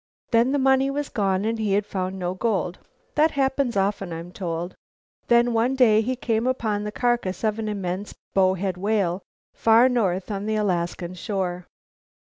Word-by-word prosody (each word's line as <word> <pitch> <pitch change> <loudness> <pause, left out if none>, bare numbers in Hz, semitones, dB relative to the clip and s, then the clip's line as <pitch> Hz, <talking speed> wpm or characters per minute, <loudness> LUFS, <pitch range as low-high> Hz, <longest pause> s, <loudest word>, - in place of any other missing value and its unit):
Then 235 +2 +4
the 285 - +2
money 265 0 +3
was 285 +1 -3
gone 195 -2 0
and 225 0 -1
he 210 -3 0
had 205 +1 +2
found 190 -2 -3
no 180 -1 -2
gold. 185 -4 -1 0.3
That 310 +2 +4
happens 270 -5 0
often, 195 -2 0
I'm 165 +2 -6
told. 175 -1 -4 0.5
Then, 240 0 +4
one 235 +4 +2
day 220 -5 +5
he 255 +4 -1
came 230 -1 -1
upon 220 -5 -1
the 210 - -4
carcass 240 -5 -1
of 215 0 0
an 215 -1 -2
immense 195 -1 -4 0.2
bowhead 190 -1 +1
whale 195 -2 0 0.3
far 230 +2 +5
north 195 -5 0
on 200 +1 -3
the 220 - 0
Alaskan 175 -3 -1
shore. 180 -2 -3
210 Hz, 170 wpm, -24 LUFS, 185-235 Hz, 0.5 s, day